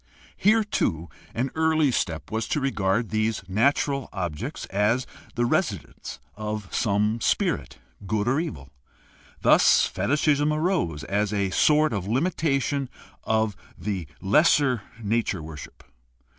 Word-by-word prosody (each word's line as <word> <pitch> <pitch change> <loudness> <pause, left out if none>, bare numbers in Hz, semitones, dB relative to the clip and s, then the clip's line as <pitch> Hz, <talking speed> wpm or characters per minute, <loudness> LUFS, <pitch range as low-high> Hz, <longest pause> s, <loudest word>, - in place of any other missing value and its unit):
Here, 220 +2 +3
too, 85 - -1 0.3
an 130 +3 -1
early 160 -3 +2
step 80 - -2
was 110 0 -2
to - - 0
regard 115 -5 0
these 110 -1 -1
natural 140 +6 +1
objects 85 -6 -4
as 105 +6 +1 0.3
the 120 - +1
residence - - -2 0.2
of 105 -1 -4
some 105 +1 +1
spirit, - - 0 0.3
good 105 +2 0
or 135 +4 +2
evil. 70 - -5 0.7
Thus - - +5
fetishism 145 +7 +1
arose 155 - 0
as 100 +4 -1
a 100 -2 0
sort 150 +6 +3
of 100 -3 -3
limitation 140 - 0 0.4
of 110 -2 +1 0.2
the 95 -6 -4
lesser 130 +2 +3 0.2
nature 105 -5 -1
worship. 75 -3 -10
110 Hz, 120 wpm, -25 LUFS, 100-140 Hz, 0.7 s, Thus